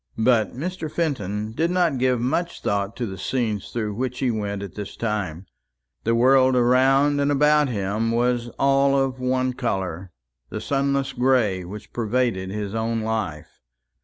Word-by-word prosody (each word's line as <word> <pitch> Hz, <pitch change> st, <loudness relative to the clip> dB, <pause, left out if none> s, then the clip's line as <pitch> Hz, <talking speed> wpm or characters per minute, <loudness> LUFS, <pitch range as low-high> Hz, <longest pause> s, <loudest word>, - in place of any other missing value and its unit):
But 110 Hz, -2 st, +2 dB
Mr. 165 Hz, 0 st, -4 dB
Fenton 110 Hz, -, -2 dB
did 160 Hz, +9 st, 0 dB
not 175 Hz, -7 st, +1 dB
give 125 Hz, -1 st, +2 dB
much 170 Hz, +8 st, -2 dB
thought 100 Hz, +1 st, -1 dB
to 120 Hz, -, -3 dB
the 95 Hz, -3 st, -7 dB
scenes 110 Hz, -2 st, -2 dB
through 110 Hz, -3 st, -3 dB
which 125 Hz, +3 st, -3 dB
he 130 Hz, -3 st, +1 dB
went 100 Hz, -2 st, -3 dB
at 100 Hz, -, -8 dB
this 105 Hz, -1 st, -7 dB
time; 100 Hz, -6 st, -3 dB, 0.6 s
the 115 Hz, +1 st, +2 dB
world 130 Hz, +2 st, +5 dB
around 135 Hz, +4 st, +4 dB
and 140 Hz, +1 st, +2 dB
about 150 Hz, 0 st, +4 dB
him 105 Hz, 0 st, -1 dB
was 120 Hz, 0 st, +1 dB
all 140 Hz, 0 st, +3 dB
of 130 Hz, -1 st, -1 dB
one 130 Hz, 0 st, 0 dB
colour 95 Hz, -7 st, -3 dB, 0.4 s
the -, -, -4 dB
sunless 140 Hz, -1 st, 0 dB
gray 125 Hz, -7 st, +2 dB
which 100 Hz, +4 st, -10 dB
pervaded 115 Hz, -4 st, 0 dB
his 105 Hz, 0 st, -4 dB
own 115 Hz, 0 st, -1 dB
life. 105 Hz, -9 st, -4 dB
120 Hz, 160 wpm, -23 LUFS, 105-135 Hz, 0.6 s, world